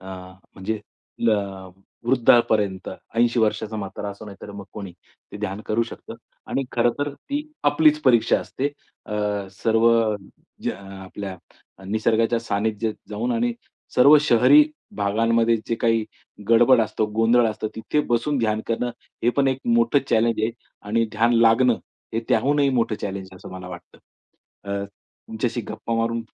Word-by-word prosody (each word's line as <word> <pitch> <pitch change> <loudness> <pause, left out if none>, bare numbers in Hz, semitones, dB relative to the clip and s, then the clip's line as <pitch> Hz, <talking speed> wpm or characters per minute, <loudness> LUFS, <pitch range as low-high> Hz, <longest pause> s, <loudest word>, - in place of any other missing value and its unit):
अ, 95 - -13 0.5
म्हणजे 105 +3 -3
आपलं 100 -4 -3 0.4
वृद्धापर्यंत 115 -6 +3 0.3
80 120 +1 +2
वर्षांचा 110 0 0
म्हातारा 100 0 -5
असो, 100 +2 -10
नाहीतर 100 0 -10
मग 100 -1 -8
कोणी 100 -4 -7 0.4
ते - - -6
ध्यान 105 -1 -4
करू 110 +2 +1
शकतं. 115 - -8 0.3
आणि 135 - -1
खरंतर 120 +5 0
ती 285 - -4 0.2
आपलीच 150 +1 +4
परीक्षा 120 -4 +4
असते. 135 - -3 0.4
अ, 105 - -5 0.4
सर्व 115 +4 +2 0.7
ज्या - - -2 0.3
आपल्या 95 0 -7 0.5
निसर्गाच्या 110 +3 +1
सान्निध्यात 110 0 -1
जाऊन 115 +4 -2
आणि 120 +1 +1 0.4
सर्व 140 +4 +8
शहरी 150 - +6 0.3
भागांमध्ये 115 +3 +2
जे 115 - 0
काही 115 -1 +1 0.4
गडबड 120 +2 +6
असतो, 110 0 0
गोंधळ 115 +2 +4
असतो, 110 0 -3
तिथे 110 +7 0
बसून 135 +5 0
ध्यान 110 -2 0
करणं, 120 +2 -1 0.3
हे 120 - +4
पण 140 -1 +3
एक 130 0 0 0.2
मोठं 115 +4 +4
चॅलेंज 115 -1 +2
आहे. 110 - +1 0.4
आणि 115 +2 +2
ध्यान 115 +2 +2
लागणं 115 +1 +4 0.4
हे 115 - +1
त्याहूनही 140 +4 +3
मोठं 115 -3 +1
चॅलेंज 95 -1 -4
आहे, 95 - -13
असं - - -11
मला 90 -1 -8
वाटतं. 85 -1 -11 0.7
अ, 100 0 -2
तुमच्याशी 110 +4 -6
गप्पा 115 - -4
मारून 115 0 0
115 Hz, 145 wpm, -23 LUFS, 105-120 Hz, 0.7 s, सर्व